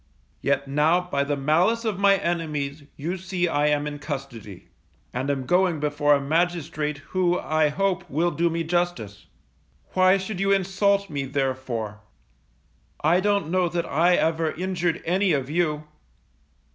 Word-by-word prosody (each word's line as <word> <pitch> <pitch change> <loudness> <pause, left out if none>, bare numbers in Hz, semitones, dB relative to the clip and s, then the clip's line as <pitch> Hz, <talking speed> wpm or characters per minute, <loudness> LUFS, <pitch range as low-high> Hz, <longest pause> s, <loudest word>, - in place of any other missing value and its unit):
Yet 140 0 0
now 150 +5 +3
by 160 -6 -1
the 145 0 -2
malice 175 +12 +2
of 210 -4 -1
my 200 0 +5
enemies, 150 -5 -3
you 170 +6 -3
see 180 -1 -1
I 145 -2 +1
am 145 0 +1
in 145 -1 -5
custody, 135 - -7 0.4
and 130 +3 -2
am 135 -2 -1
going 180 0 +2
before 145 0 +2
a - - 0
magistrate 155 -1 -1 0.2
who 180 -1 +2
I 155 -1 +1
hope 190 +3 -1
will 165 +5 +1
do 170 0 +1
me 165 0 -2
justice. 160 - -2 0.7
Why 185 +1 +5
should 190 0 -5
you 195 0 +1
insult 200 +1 +2
me, 140 -2 -2
therefore? 130 -6 -3 1.0
I 165 +4 +4
don't 200 -4 0
know 180 -1 +2
that 170 0 -2
I 175 +4 +3
ever 160 -1 +1
injured 175 -1 -2
any 185 +1 +2
of 135 -1 -2
you? 155 -3 0
160 Hz, 155 wpm, -24 LUFS, 145-180 Hz, 1.0 s, my